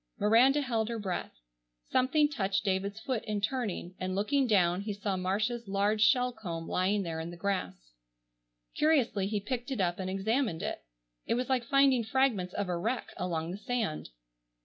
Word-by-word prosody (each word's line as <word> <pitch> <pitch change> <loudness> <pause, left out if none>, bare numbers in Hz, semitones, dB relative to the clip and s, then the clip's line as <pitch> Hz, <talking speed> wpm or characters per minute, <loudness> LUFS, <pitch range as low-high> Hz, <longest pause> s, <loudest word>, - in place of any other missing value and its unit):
Miranda 250 +7 +5
held 230 -5 -1
her 235 - -2
breath. 195 -4 -3 0.6
Something 295 +4 +3
touched 200 -8 -1
David's 200 +2 -1
foot 245 -1 -2
in 210 -1 -1
turning, 210 -5 -2
and, 185 0 -2
looking 260 +7 +1
down, 180 -4 +3
he 205 0 -3
saw 200 -1 -2
Marcia's 210 +5 -1
large 200 +2 +1
shell 250 +1 +4
comb 170 -7 -6
lying 195 +2 +1
there 165 -2 -4
in 160 +1 -4
the 175 - -9
grass. 90 - -3 0.8
Curiously 260 -11 +2
he 210 0 -1
picked 245 +5 -4
it 265 -5 -3
up 175 -1 0
and 185 0 -3
examined 200 0 0
it. - - -3 0.5
It - - +2
was 250 +2 -2
like 255 -2 +2
finding 270 -1 +4
fragments 220 -6 +1
of 200 - -1
a 180 - -1
wreck 230 +8 -2
along 170 -2 -2
the 185 - -5
sand. 225 - -2
210 Hz, 175 wpm, -30 LUFS, 185-245 Hz, 0.8 s, Miranda